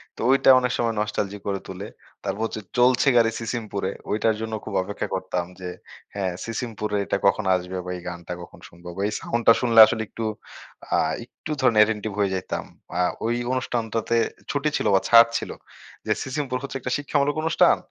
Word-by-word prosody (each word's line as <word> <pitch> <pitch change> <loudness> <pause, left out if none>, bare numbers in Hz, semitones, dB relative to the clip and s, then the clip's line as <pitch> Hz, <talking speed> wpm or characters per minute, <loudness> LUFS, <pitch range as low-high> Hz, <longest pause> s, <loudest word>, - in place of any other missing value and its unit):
তো - - -8
ওই 135 - +6
টা - - +6
অনেক 125 0 -1
সময় 115 -2 0
নস্টালজিক 105 -1 -2
করে 100 -1 -1
তোলে। 95 +3 -7 0.4
তারপর 105 - -3
হচ্ছে 110 - -5 0.2
"চলছে 125 +1 +4
গাড়ি 115 -1 +4
সিসিমপুরে" 110 -4 -3 0.2
ওইটার 110 +1 +2
জন্য 110 0 -4
খুব 110 - -6
অপেক্ষা 100 +2 -4
করতাম 95 -2 -2
যে, 90 - -5 0.5
হ্যাঁ, 95 -3 -1
সিসিমপুরে 110 -3 -3
এটা - - 0
কখন 100 +1 +2
আসবে 90 +1 -4
বা 90 - -4
এই - - -10
গানটা 85 0 -6
কখন 85 - -12
শুনব 85 +1 -19
বা - - -2
এই 105 - -3
সাউন্ডটা 115 0 +3
শুনলে 115 -2 +4
আসলে 110 - -2
একটু 115 - -5 0.7
আ - - +4 0.3
একটু 155 - -9
ধরেন 120 -4 +3
অ্যাটেনটিভ 105 0 +3
হয়ে 100 -2 +2
যাইতাম। 95 - -3 0.4
আ - - +4 0.2
ওই 120 - +1 0.2
অনুষ্ঠানটাতে 115 -2 -1 0.3
ছুটি 145 +1 0
ছিল - - -1
বা - - +6
ছাড় 115 0 +8
ছিল - - -5 0.5
যে - - -1
"সিসিমপুর" 130 -1 -2
হচ্ছে 135 -1 -4
একটা 125 0 -4
শিক্ষামূলক 145 0 0
অনুষ্ঠান 165 +1 +4
110 Hz, 185 wpm, -24 LUFS, 100-125 Hz, 0.7 s, ছাড়